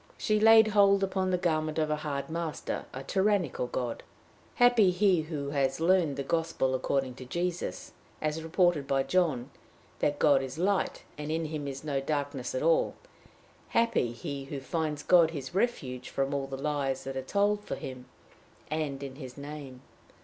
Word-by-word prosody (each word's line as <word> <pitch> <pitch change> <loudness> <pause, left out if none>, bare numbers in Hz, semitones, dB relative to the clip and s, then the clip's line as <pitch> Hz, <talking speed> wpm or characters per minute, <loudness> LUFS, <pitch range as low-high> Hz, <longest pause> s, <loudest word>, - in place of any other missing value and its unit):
She 215 -1 +1
laid 220 0 +7
hold 200 -1 +5
upon 190 -1 0
the 180 - +2
garment 155 -3 0
of 155 -1 +1
a 150 - +1
hard 145 -2 -3
master, 165 -3 -4
a 130 - -7
tyrannical 190 -8 +1
God. 120 -1 -3 0.5
Happy 245 -5 +5
he 180 -1 +3
who 150 -3 -4
has 135 -1 0
learned 165 -4 +3
the 140 - -2
gospel 165 -3 0
according 130 0 0
to 130 +1 -10
Jesus, 170 - -3 0.3
as 155 +1 -2
reported 165 -3 +2
by 135 -1 +2
John 145 -7 0 0.5
that 145 0 +1
God 145 -3 +4
is 135 +2 -6
light, 190 +3 0 0.2
and 150 +1 -4
in 160 0 -1
him 150 -2 -4
is 135 +1 -6
no 145 -3 -1
darkness 145 - -3
at - - -1
all! - - +3 0.8
Happy 230 - +2
he 140 +2 -6
who 140 0 -5
finds 150 +2 -2
God 170 -3 +6
his 145 -2 -6
refuge 135 - -1
from 135 +1 -1
all 140 -1 -1
the 135 0 -5
lies 140 -2 -1
that 135 0 -5
are 130 - -2
told 205 +8 +1
for - - -4
him, 130 -1 -8 0.6
and 145 -3 -2
in 135 -1 -7
his 130 -3 -9
name! 140 -3 -8
150 Hz, 175 wpm, -29 LUFS, 135-180 Hz, 0.8 s, laid